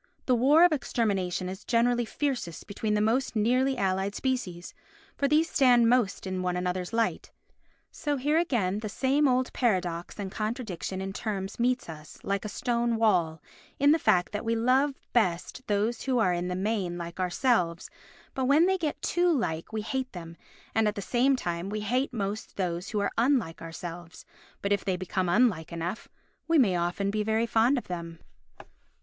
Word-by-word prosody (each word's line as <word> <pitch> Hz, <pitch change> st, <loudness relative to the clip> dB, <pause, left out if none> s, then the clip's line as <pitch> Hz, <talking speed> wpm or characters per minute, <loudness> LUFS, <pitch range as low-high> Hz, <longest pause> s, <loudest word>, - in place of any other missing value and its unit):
The 255 Hz, -, +3 dB
war 285 Hz, +8 st, +6 dB
of 355 Hz, -, +4 dB
extermination 200 Hz, -, -1 dB
is 190 Hz, +2 st, -7 dB
generally 240 Hz, 0 st, +2 dB
fiercest 250 Hz, -, -3 dB
between 210 Hz, +1 st, -2 dB
the 210 Hz, -, +2 dB
most 235 Hz, +4 st, +1 dB
nearly 255 Hz, +5 st, +2 dB
allied 195 Hz, -1 st, 0 dB
species, 195 Hz, -10 st, -3 dB, 0.4 s
for 280 Hz, -, +1 dB
these 305 Hz, +3 st, +3 dB
stand 245 Hz, -6 st, +4 dB
most 235 Hz, -7 st, +1 dB
in 185 Hz, -1 st, -3 dB
one 180 Hz, -1 st, -1 dB
another's 180 Hz, 0 st, -2 dB
light. 230 Hz, -1 st, -1 dB, 0.6 s
So 290 Hz, -1 st, -2 dB
here 295 Hz, +5 st, +2 dB
again 210 Hz, -, 0 dB
the 215 Hz, -1 st, -5 dB
same 275 Hz, +6 st, +2 dB
old 255 Hz, 0 st, +1 dB
paradox 180 Hz, -8 st, -1 dB
and 200 Hz, -2 st, -5 dB
contradiction 215 Hz, -4 st, -4 dB
in 195 Hz, 0 st, -4 dB
terms 195 Hz, -1 st, -4 dB
meets 250 Hz, +1 st, +1 dB
us, 155 Hz, -2 st, -10 dB
like 200 Hz, 0 st, -1 dB
a -, -, -3 dB
stone 235 Hz, +1 st, 0 dB
wall, 175 Hz, -8 st, +1 dB, 0.3 s
in 285 Hz, +1 st, +5 dB
the 320 Hz, -, +4 dB
fact 180 Hz, -, +2 dB
that 205 Hz, 0 st, -3 dB
we 230 Hz, 0 st, 0 dB
love 260 Hz, +5 st, +2 dB, 0.2 s
best 215 Hz, +3 st, 0 dB
those 215 Hz, +3 st, 0 dB
who 260 Hz, -2 st, 0 dB
are 185 Hz, -6 st, +3 dB
in 175 Hz, +1 st, -2 dB
the 180 Hz, -, -2 dB
main 190 Hz, -3 st, -1 dB
like 170 Hz, +1 st, -7 dB
ourselves, 180 Hz, -2 st, +1 dB, 0.5 s
but 265 Hz, -, -1 dB
when 290 Hz, +6 st, +5 dB
they 380 Hz, 0 st, +1 dB
get 310 Hz, -3 st, -2 dB
too 350 Hz, 0 st, +2 dB
like, 165 Hz, -, -1 dB
we 220 Hz, -1 st, -2 dB
hate 260 Hz, +3 st, -3 dB
them, 165 Hz, -2 st, -8 dB, 0.4 s
and, 220 Hz, -1 st, +2 dB
at 210 Hz, -, -1 dB
the 200 Hz, -, -4 dB
same 260 Hz, +5 st, +2 dB
time, 175 Hz, -5 st, -3 dB
we 210 Hz, +1 st, -3 dB
hate 250 Hz, +6 st, 0 dB
most 210 Hz, -2 st, -4 dB
those 175 Hz, -2 st, -2 dB
who 210 Hz, -, -1 dB
are 200 Hz, -, 0 dB
unlike 235 Hz, -, +1 dB
ourselves, 170 Hz, +1 st, -8 dB, 0.4 s
but 200 Hz, 0 st, +2 dB
if 200 Hz, -, -1 dB
they 185 Hz, -2 st, -1 dB
become 185 Hz, 0 st, -2 dB
unlike 180 Hz, -5 st, +2 dB
enough, 170 Hz, +5 st, -4 dB, 0.4 s
we 330 Hz, 0 st, +3 dB
may 210 Hz, -10 st, +4 dB
often 175 Hz, +3 st, -1 dB
be 215 Hz, +1 st, -1 dB
very 220 Hz, +2 st, +1 dB
fond 230 Hz, +4 st, +3 dB
of 245 Hz, -, -5 dB
them. 170 Hz, -2 st, -6 dB
215 Hz, 185 wpm, -28 LUFS, 180-255 Hz, 0.6 s, war